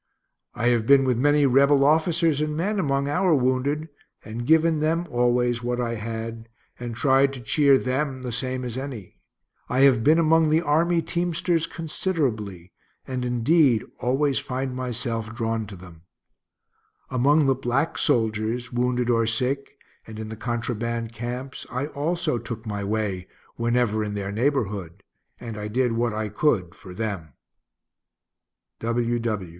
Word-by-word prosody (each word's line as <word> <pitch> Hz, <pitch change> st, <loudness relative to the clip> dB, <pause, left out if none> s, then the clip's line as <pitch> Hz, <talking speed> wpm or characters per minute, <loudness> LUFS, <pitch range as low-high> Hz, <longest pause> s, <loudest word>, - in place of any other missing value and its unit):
I 120 Hz, -, +1 dB
have 115 Hz, -2 st, +1 dB
been 140 Hz, -1 st, +6 dB
with 125 Hz, -3 st, +1 dB
many 145 Hz, +2 st, +4 dB
Rebel 140 Hz, +1 st, +4 dB
officers 160 Hz, 0 st, +2 dB
and 150 Hz, 0 st, -1 dB
men 200 Hz, +5 st, 0 dB
among 140 Hz, -4 st, 0 dB
our 175 Hz, +3 st, +2 dB
wounded, 135 Hz, +4 st, 0 dB, 0.4 s
and 115 Hz, +2 st, -6 dB
given 160 Hz, 0 st, +4 dB
them 165 Hz, +3 st, 0 dB
always 120 Hz, -1 st, +1 dB
what 120 Hz, 0 st, -2 dB
I 120 Hz, -1 st, -1 dB
had, 115 Hz, +1 st, -5 dB, 0.3 s
and 120 Hz, -1 st, -5 dB
tried 135 Hz, +2 st, +3 dB
to 135 Hz, -, -7 dB
cheer 140 Hz, +4 st, +4 dB
them 130 Hz, 0 st, -2 dB
the 125 Hz, -, -4 dB
same 130 Hz, +1 st, -3 dB
as 120 Hz, +1 st, -4 dB
any. 125 Hz, -9 st, -8 dB, 0.5 s
I 130 Hz, +1 st, +1 dB
have 130 Hz, -5 st, +5 dB
been 155 Hz, +5 st, +5 dB
among 165 Hz, -1 st, +4 dB
the 160 Hz, +2 st, +3 dB
army 165 Hz, +3 st, +2 dB
teamsters 170 Hz, -1 st, 0 dB
considerably, 125 Hz, -, -3 dB, 0.3 s
and 130 Hz, -1 st, -3 dB
indeed 125 Hz, +1 st, +3 dB, 0.2 s
always 135 Hz, +2 st, +1 dB
find 130 Hz, 0 st, -4 dB
myself 115 Hz, -3 st, -3 dB
drawn 115 Hz, -2 st, -2 dB
to 100 Hz, -, -9 dB
them. 90 Hz, -3 st, -13 dB, 1.1 s
Among 140 Hz, +4 st, +3 dB
the 135 Hz, -, +4 dB
black 135 Hz, +5 st, -1 dB
soldiers, 115 Hz, -2 st, 0 dB
wounded 125 Hz, 0 st, 0 dB
or 115 Hz, -2 st, +2 dB
sick, 130 Hz, +5 st, -1 dB, 0.3 s
and 110 Hz, -1 st, -9 dB
in 110 Hz, 0 st, -6 dB
the 110 Hz, -, -6 dB
contraband 115 Hz, 0 st, -3 dB
camps, 125 Hz, +3 st, -6 dB
I 130 Hz, +3 st, -2 dB
also 155 Hz, -2 st, -1 dB
took 115 Hz, -1 st, -7 dB
my 100 Hz, -2 st, -3 dB
way 100 Hz, -3 st, -2 dB, 0.3 s
whenever 115 Hz, -2 st, +1 dB
in 105 Hz, -1 st, -4 dB
their 100 Hz, -1 st, -3 dB
neighborhood, 105 Hz, -, -1 dB, 0.4 s
and 115 Hz, -3 st, -7 dB
I 105 Hz, -, -4 dB
did 125 Hz, +3 st, +1 dB
what 115 Hz, +1 st, 0 dB
I 110 Hz, 0 st, -3 dB
could 100 Hz, -, +1 dB
for 95 Hz, -, -13 dB
them. 95 Hz, -7 st, -4 dB
125 Hz, 150 wpm, -24 LUFS, 115-145 Hz, 1.1 s, been